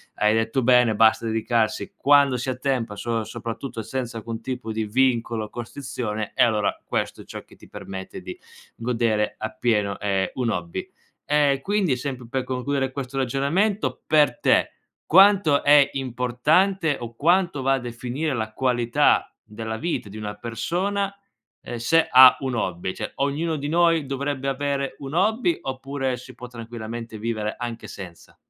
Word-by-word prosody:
hai 105 +1 +3
detto 115 +4 0
bene, 125 -2 +4
basta 110 +2 +4
dedicarsi 115 0 0
quando 140 -2 +4
si 130 +2 -2
ha - - -4
tempo, 125 -5 -2
so 115 +2 -2
soprattutto 115 +2 -6
senza 120 +1 -4
alcun 115 +1 -6
tipo 125 -2 -5
di 110 0 -2
vincolo 115 -1 +1
o - - -12
costrizione 120 -3 -5
e 130 - +5
allora 110 -4 +1
questo - - -2
è - - -14
ciò - - -8
che - - -19
ti - - -17
permette 95 - -8
di 360 - -8 0.4
godere 115 -3 0
appieno, 110 -3 -1
ehm, 95 -2 0
un 125 -3 0
hobby. 85 -4 -4 0.4
E 145 -2 +2
quindi, 195 -8 +1
sempre 125 -2 -5
per 130 +2 -2
concludere 130 +1 -2
questo 135 -1 -6
ragionamento, 140 - 0
per 150 -6 +3
te - - +3 0.3
quanto 190 -5 +5
è 145 -1 +6
importante 140 +7 +1
o 115 -1 -8
quanto 170 0 +2
va 135 +1 +2
a 135 - +1
definire 125 +5 -3
la 110 -3 -3
qualità 120 -2 +2
della 110 +1 -6
vita 160 -7 -3
di 105 - -9
una 105 -1 -5
persona, 180 - -2 0.5
ehm, 120 - -6
se 160 +8 +3
ha 130 0 +9
un 130 -2 -2
hobby. 95 -4 -2
Cioè - - -6
ognuno 150 +4 -1
di 145 -1 -4
noi 165 -2 +3
dovrebbe 135 0 -2
avere 140 0 -2
un 135 +1 -7
hobby 220 - +2
oppure 135 0 -3
si 125 +1 -12
può 125 - -9
tranquillamente 115 -1 -7
vivere 110 -1 -3
anche 120 -1 -6
senza? 90 -4 -11
125 Hz, 160 wpm, -24 LUFS, 115-140 Hz, 0.5 s, ha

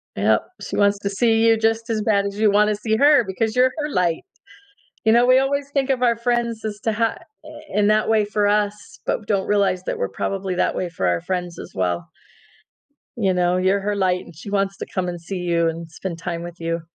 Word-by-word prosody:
Yep, 105 +2 +3 0.3
she - - -4
wants 200 0 +3
to 200 - -2
see 225 +2 +2
you 225 0 +5
just 225 +1 0
as 220 -1 0
bad 200 -2 +2
as 200 +1 -5
you 215 -1 +4
wanna 210 +1 +3
see 220 +1 -1
her, 285 0 +5
because 215 +4 -2
you're 255 +1 +4
her 300 0 -2
light. 175 - 0 0.8
You 220 - +5
know, 240 +1 +5
we 255 +1 +6
always 280 +1 -1
think 275 -1 0
of 255 -2 +1
our 235 -2 +3
friends 235 -2 -1
as 210 -1 -4
to 225 - 0
ha 230 +1 0 0.3
i - - -10 0.2
in 210 0 +2
that 215 +1 +2
way 215 -2 +3
for 205 0 0
us, 210 +1 -1
but 210 - -2
don't 195 -2 0
realize 200 -3 +1
that - - -3
we're 100 - -2
probably 190 - -3
that - - 0
way 180 - -2
for 130 - -2
our 85 -1 +1
friends 180 -2 -4
as - - -9
well. 90 -3 -1 1.1
You 195 -3 +2
know, 180 0 +1
you're 190 +2 +2
her 205 +1 -2
light 185 -2 +1
and 170 - -14
she 200 +5 -9
wants 195 -1 0
to - - -5
come 185 -2 -3
and 175 -1 -5
see 185 +3 -6
you, 170 -1 +1
and 165 0 -4
spend 170 +1 -6
time 170 -1 -4
with 175 0 -9
you. 165 0 -2
205 Hz, 235 wpm, -21 LUFS, 180-225 Hz, 1.1 s, we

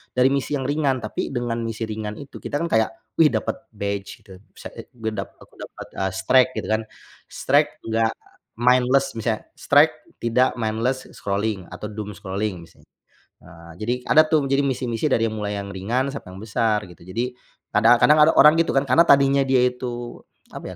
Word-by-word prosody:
dari 125 +1 +4
misi 140 +1 -1
yang 135 - -2
ringan 145 -2 +1
tapi 110 - -3
dengan 120 -2 -2
misi 115 0 -4
ringan 105 -1 -5
itu 140 - -10
kita - - -6
kan 170 - -1
kayak, 110 0 +3 0.3
wih 160 - +7
dapat 110 - -1 0.2
badge 100 +1 -5
gitu, 95 -3 -14 0.2
bisa, - - -10
eee, - - -10
juga 110 -2 -3
dap - - -18
aku - - -23
dapat, - - -9
eee, 95 -1 -1
streak 125 +7 +4
gitu - - -4
kan 110 0 +1 0.5
streak - - +2 0.2
nggak 115 0 +1 0.5
mindless, 125 +2 +3
misalnya 110 -1 -2 0.2
streak - - +5 0.3
tidak 120 +2 +2
mindless 115 +4 -1
scrolling 100 -2 -3
atau 105 - -6
doom 105 0 -6
scrolling 95 -2 -4
misalnya. 85 - -20 0.6
Eee, 85 -1 -14
jadi 120 +3 0 0.2
ada 155 - +8
tuh 155 -3 +2
jadi 135 +1 +1
misi-misi 125 -1 -1
dari 115 -2 +2
yang 110 - -5
mulai 105 -1 -3
yang 100 - -6
ringan 115 +8 -1
sampai 90 - -8
yang - - -10
besar 110 -1 0
gitu. 90 - -16
Jadi 115 +8 -3 0.4
kadang 115 +3 +5
kadang 150 - +6
ada 160 - +5
orang 150 - +8
gitu 165 - +2
kan 135 - +3
karena 130 +7 +5
tadinya 140 0 +5
dia 130 -1 +3
itu 120 -1 -6 0.3
apa - - -8
115 Hz, 190 wpm, -22 LUFS, 105-130 Hz, 0.6 s, ada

